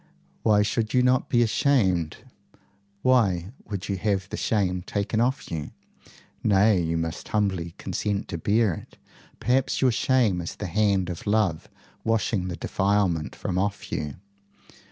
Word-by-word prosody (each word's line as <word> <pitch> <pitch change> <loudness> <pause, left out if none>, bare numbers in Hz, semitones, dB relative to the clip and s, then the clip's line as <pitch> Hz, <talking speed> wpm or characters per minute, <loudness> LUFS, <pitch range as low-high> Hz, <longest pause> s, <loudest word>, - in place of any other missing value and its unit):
Why 105 -1 +4
should 110 +2 -1
you 125 - +5
not 125 0 +2
be 120 0 +4
ashamed? 100 - +2 0.9
Why 100 -8 +3 0.2
would 100 -3 -4
you 100 - -1
have 95 -1 -1
the - - -4
shame 95 -4 0
taken 105 +4 -1
off 130 +4 -1
you? 80 -3 -4 0.7
Nay; 100 -1 +4
you 85 0 -1
must 80 0 -4
humbly 95 -6 -1
consent 100 -1 -2
to 85 - -4
bear 105 +2 +2
it. - - -11 0.4
Perhaps 125 +4 +1
your 130 -2 +4
shame 115 -6 +2
is 85 - -6
the 105 - -5
hand 95 -1 +1
of 85 - -8
love 100 -6 +1 0.3
washing 110 -4 0
the 90 - -4
defilement 95 -5 0
from 90 - -2
off 100 +1 -2
you. 75 -2 -3
100 Hz, 150 wpm, -25 LUFS, 90-110 Hz, 0.9 s, you